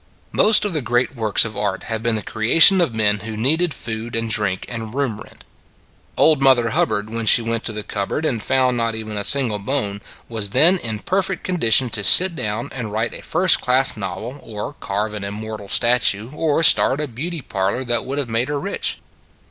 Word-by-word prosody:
Most 215 0 +4
of 205 - -3
the 155 - -2
great 120 +3 -1
works 110 -2 +1
of 110 -2 -7
art 100 -2 -3
have 110 -2 -5
been 115 0 -1
the 105 - -4
creation 165 - +5
of 165 - 0
men 105 -2 0
who 110 +1 -8
needed 160 +9 +1
food 115 -2 -6
and 115 -1 -2
drink 100 -3 -1
and 115 -1 -8
room 130 -7 -3
rent. - - -15 0.7
Old 155 -3 +3
Mother 125 -4 +3
Hubbard 105 -1 -1
when 115 -1 -4
she 115 - +6
went 115 0 -3
to - - -2
the 105 -1 -6
cupboard 105 +11 -4
and 120 -7 -2
found 130 +1 0
not 115 -1 -2
even 110 -1 -7
a 105 - -3
single 120 -4 +4
bone, 100 -3 -3 0.3
was 110 -3 -1
then 175 +7 +5
in 110 -5 -4
perfect 190 0 -2
condition 130 -8 +2
to 105 - -2
sit 180 - +6
down 110 -2 -5
and 115 -5 -6
write 110 +3 -3
a - - -9
first 180 +1 +3
class 130 +2 +3
novel, 110 +7 -7
or 105 +5 -8
carve 105 +1 -4
an 105 -1 -7
im 100 +1 -6
mortal 110 -2 -8
statue 120 -1 +1
or 155 +1 -1
start 140 -2 +5
a 150 - -3
beauty 150 +5 -7
parlor 100 +6 -3
that 120 -2 -1
would 135 +2 -6
have 140 -3 -2
made 115 +2 -2
her 145 0 -3
rich. 200 +7 -3
115 Hz, 210 wpm, -19 LUFS, 105-140 Hz, 0.7 s, she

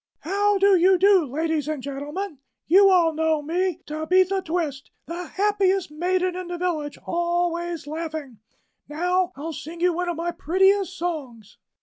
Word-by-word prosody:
"How 405 +4 +1
do 395 0 +5
you 370 +1 +5
do, 385 -2 +5
ladies 310 +2 -1
and 305 -4 -3
gentlemen? 290 +5 -5 0.3
You 390 +4 +6
all 345 -4 +4
know 315 -1 0
me, 350 +2 -1
Tabitha 365 +5 +1
Twist, 315 -6 -3 0.2
the 345 +1 -6
happiest 390 -3 +1
maiden 365 +3 0
in 365 -1 -5
the 350 0 -4
village; 320 -5 -2
always 345 -1 -1
laughing. 305 -6 -6 0.5
Now, 360 +4 0
I'll 320 +4 -6
sing 325 +4 -8
you 355 0 +2
one 355 +1 -2
of 345 - -2
my 345 +1 -2
prettiest 380 +2 +2
songs." 265 - -5
345 Hz, 150 wpm, -24 LUFS, 310-370 Hz, 0.5 s, You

